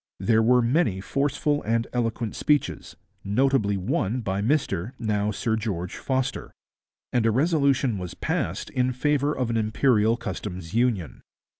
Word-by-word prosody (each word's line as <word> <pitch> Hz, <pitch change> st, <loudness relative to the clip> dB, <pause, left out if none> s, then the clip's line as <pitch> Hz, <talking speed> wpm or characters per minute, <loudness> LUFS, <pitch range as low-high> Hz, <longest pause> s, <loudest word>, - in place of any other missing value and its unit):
There 110 Hz, +4 st, +3 dB
were 125 Hz, +2 st, +4 dB
many 120 Hz, -, +1 dB
forceful 145 Hz, +6 st, 0 dB
and 115 Hz, +1 st, 0 dB
eloquent 115 Hz, -2 st, -2 dB
speeches, 150 Hz, -1 st, 0 dB, 0.3 s
notably 105 Hz, -1 st, +2 dB
one 95 Hz, +5 st, -1 dB
by 100 Hz, -2 st, -2 dB
Mr, 115 Hz, -, 0 dB
now 105 Hz, -2 st, 0 dB
Sir 110 Hz, +2 st, -1 dB
George, 95 Hz, -6 st, -3 dB
Foster, 130 Hz, -1 st, -2 dB, 0.6 s
and 120 Hz, -, +2 dB
a -, -, +4 dB
resolution 140 Hz, -, +2 dB
was 90 Hz, -2 st, -6 dB
passed -, -, -2 dB
in 125 Hz, 0 st, 0 dB
favour 145 Hz, +2 st, +1 dB
of 125 Hz, -3 st, -1 dB
an 115 Hz, -, 0 dB
Imperial 110 Hz, 0 st, +2 dB
Customs 95 Hz, -5 st, -6 dB
Union. 115 Hz, -7 st, 0 dB
115 Hz, 140 wpm, -25 LUFS, 105-130 Hz, 0.6 s, were